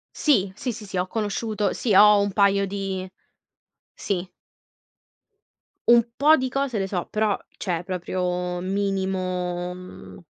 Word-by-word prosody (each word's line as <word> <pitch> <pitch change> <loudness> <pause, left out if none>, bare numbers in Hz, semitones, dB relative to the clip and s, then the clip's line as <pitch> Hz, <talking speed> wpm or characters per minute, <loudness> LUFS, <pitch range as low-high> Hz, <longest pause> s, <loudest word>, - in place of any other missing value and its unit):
Sì, 200 - +2
sì, 250 +4 -3
sì, 215 -1 -9
sì, 190 -2 -5
ho 180 - -1
conosciuto 210 0 -2
sì, 215 -6 0
ho 210 +1 +7
un 200 - 0
paio 200 -1 +3
di 190 -1 -4 0.8
Sì. 185 -2 -3 1.6
Un 235 0 +5
po' 305 +3 +5
di 260 0 -1
cose 275 -4 -1
le 195 - -1
so, 180 -3 -3
però, 215 -1 +1 0.2
cioè, 175 -4 -2
proprio, 180 0 -3
minimo, 185 -2 -2
mhmm, 180 0 -11
195 Hz, 135 wpm, -24 LUFS, 185-210 Hz, 1.6 s, ho